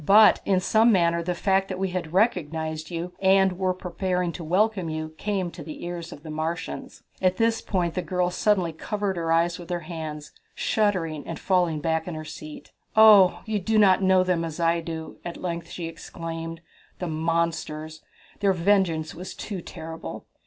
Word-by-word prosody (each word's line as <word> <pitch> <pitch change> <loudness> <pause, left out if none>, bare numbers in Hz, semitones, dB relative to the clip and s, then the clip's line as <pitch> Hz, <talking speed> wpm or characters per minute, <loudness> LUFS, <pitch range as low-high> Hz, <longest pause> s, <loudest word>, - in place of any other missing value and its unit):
"But 210 +6 +7
in 190 -2 +3
some 220 +5 +4
manner 170 -3 +3
the 175 +1 -2
fact 195 +1 +2
that 185 - -4
we 190 0 -1
had 180 -3 -4
recognized 160 -6 0
you, 175 +1 -4
and 190 -1 +4
were 185 -1 +2
preparing 180 0 -2
to 170 - -7
welcome 190 +1 +1
you, 155 0 -3
came 195 -4 -1
to 170 - -10
the 155 +2 -8
ears 175 0 -5
of 145 - -11
the 155 - -7
Martians." 160 +4 -4 0.2
At 185 -1 +2
this 225 0 +2
point 175 -4 -1
the 180 - -1
girl 180 +1 0
suddenly 185 -3 +1
covered 205 +3 -2
her 165 -1 -1
eyes 170 +2 +2
with 175 - -10
her 175 -1 -2
hands, 155 -2 -6 0.2
shuddering 180 -8 0
and 165 - -4
falling 175 -5 +1
back 160 +1 0
in 175 - -4
her 155 0 -6
seat. 155 0 -9 0.2
"Oh, 210 -4 +7
you 215 -1 -1
do 220 +4 +1
not 195 -3 +5
know 190 -1 +4
them 180 -2 0
as 165 0 -5
I 170 0 +2
do!" 160 -1 -6
at 175 - -6
length 170 -1 -4
she 170 - -5
exclaimed. 165 0 -6 0.4
"The 180 - -4
monsters! 160 -1 -2 0.4
Their 200 -1 +3
vengeance 170 -4 +1
was 180 +2 -8
too 195 -4 -5
terrible! 160 -1 -8
175 Hz, 185 wpm, -25 LUFS, 165-190 Hz, 0.4 s, But